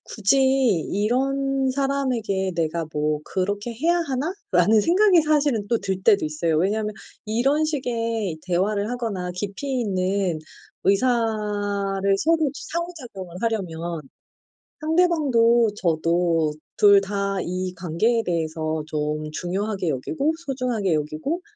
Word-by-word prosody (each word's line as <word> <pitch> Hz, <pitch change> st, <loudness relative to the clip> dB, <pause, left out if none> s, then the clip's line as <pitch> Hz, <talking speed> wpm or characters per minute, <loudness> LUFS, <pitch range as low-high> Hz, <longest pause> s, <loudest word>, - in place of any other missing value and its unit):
'굳이 215 Hz, +5 st, +1 dB, 0.5 s
이런 270 Hz, +5 st, +1 dB
사람에게 255 Hz, -9 st, -1 dB
내가 165 Hz, 0 st, -1 dB
뭐 150 Hz, 0 st, 0 dB
그렇게 205 Hz, +4 st, -2 dB
해야 335 Hz, +9 st, +1 dB
하나?' 295 Hz, +3 st, -2 dB, 0.2 s
라는 200 Hz, +4 st, +4 dB
생각이 365 Hz, -, +5 dB
사실은 290 Hz, -9 st, +1 dB
또 235 Hz, -, +3 dB
들 190 Hz, -1 st, -3 dB
때도 205 Hz, -5 st, +4 dB
있어요. 155 Hz, +1 st, 0 dB
왜냐하면 210 Hz, +5 st, 0 dB, 0.3 s
이런 270 Hz, +8 st, +1 dB
식의 230 Hz, -, -2 dB
대화를 200 Hz, +4 st, 0 dB
하거나 210 Hz, -8 st, -3 dB
깊이 210 Hz, +8 st, -3 dB
있는 190 Hz, -4 st, 0 dB, 0.4 s
의사를 205 Hz, -3 st, 0 dB, 0.2 s
서로 315 Hz, 0 st, +2 dB
상호 340 Hz, +3 st, -4 dB
작용을 190 Hz, -9 st, -9 dB
하려면 175 Hz, -7 st, -2 dB, 0.8 s
상대방도 290 Hz, -9 st, +3 dB
저도 165 Hz, -3 st, +1 dB, 0.2 s
2 200 Hz, -1 st, +7 dB
다 200 Hz, 0 st, -2 dB
이 185 Hz, +1 st, -3 dB
관계에 190 Hz, +7 st, 0 dB
대해서 160 Hz, -2 st, -2 dB
좀 150 Hz, 0 st, -2 dB
중요하게 190 Hz, +2 st, -2 dB
여기고 280 Hz, -, -1 dB
소중하게 245 Hz, -9 st, 0 dB
여기고 155 Hz, -, -2 dB
205 Hz, 260 characters per minute, -23 LUFS, 180-255 Hz, 0.8 s, 2